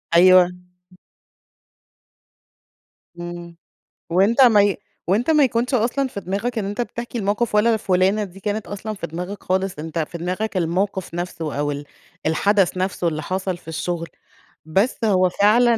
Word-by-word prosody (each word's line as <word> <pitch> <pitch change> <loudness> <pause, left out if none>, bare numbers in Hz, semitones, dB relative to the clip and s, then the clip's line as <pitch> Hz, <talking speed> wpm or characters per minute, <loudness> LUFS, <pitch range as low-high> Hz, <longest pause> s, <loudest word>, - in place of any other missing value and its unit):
أيوه. 185 0 +7 2.7
إمم. 175 -1 -8 0.5
وأنت 200 +9 +3
ما 225 -5 +7
ي 200 -1 +1 0.3
وأنت 220 - +1
ما 300 -2 +5
يكونش 250 0 0
أصلًا 250 +4 +1
في 225 - -6
دماغك 200 +6 -3
إن 210 - -1
أنت 205 +4 -2
بتحكي 235 0 -5
الموقف، 210 +2 0
ولا 225 +2 +4
فُلانة 190 +1 +2
دي 195 -1 -10
كانت 210 +1 -3
أصلًا 205 +2 -5
في 195 -5 -6
دماغك 180 +5 -6
خالص، 185 -3 -1
أنت 160 +1 -4
في 165 +2 -3
دماغك 185 +5 -3
الموقف 185 +2 -1
نفسه 165 -4 -4
أو 145 0 0
ال 145 0 -5 0.4
الحدث 190 +4 +2
نفسه 185 -1 -1
اللي 155 -2 -2
حصل 185 +2 -2
في 175 - -23
الشغل، 165 +1 -3 0.6
بس 195 +10 +1
هو 185 -3 +3
فعلًا 230 +5 +4
190 Hz, 150 wpm, -21 LUFS, 175-215 Hz, 2.7 s, أيوه